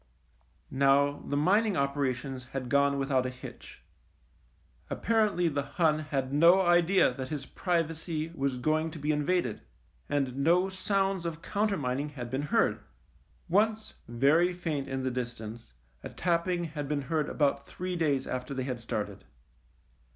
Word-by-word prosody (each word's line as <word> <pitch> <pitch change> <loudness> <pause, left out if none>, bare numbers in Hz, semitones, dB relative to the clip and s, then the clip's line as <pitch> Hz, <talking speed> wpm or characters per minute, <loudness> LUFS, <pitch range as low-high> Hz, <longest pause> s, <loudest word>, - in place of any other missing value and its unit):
Now 140 +1 +3
the 145 - -1
mining 200 +7 +3
operations 135 -2 -1
had 130 -2 -4
gone 140 +1 +3
with 135 +1 -2
out 130 -1 +2
a - - -2
hitch. 125 0 -11 1.1
Apparently 210 -6 +1
the 145 -3 0
Hun 155 +1 +1
had 140 -3 -3
no 170 +6 +6
idea 175 -4 +4
that 130 +1 -5
his 145 -1 -5
privacy 165 -1 -2
was 135 -4 -1
going 155 +5 +1
to 160 - -9
be 150 +1 0
in 150 -1 0
vaded, 175 - 0 0.5
and 135 -3 -1
no 175 +7 +3
sounds 195 -1 0
of 165 -1 -5
countermining 150 -11 -1
had 125 -5 -7
been 130 +2 -1
heard. 190 +11 +1 0.7
Once, 215 +4 +1
very 145 +9 +3
faint 160 -6 -3
in 135 0 -3
the 130 - 0
distance, 115 - -6 0.3
a - - -6
tapping 175 0 0
had 150 -3 -5
been 145 -2 -1
heard 150 +2 -1
about 140 -2 0
three 180 0 -4
days 145 -6 +1
after 130 +2 -4
they 130 - -2
had 125 -2 -4
started. 110 -2 -4
145 Hz, 150 wpm, -29 LUFS, 135-175 Hz, 1.1 s, no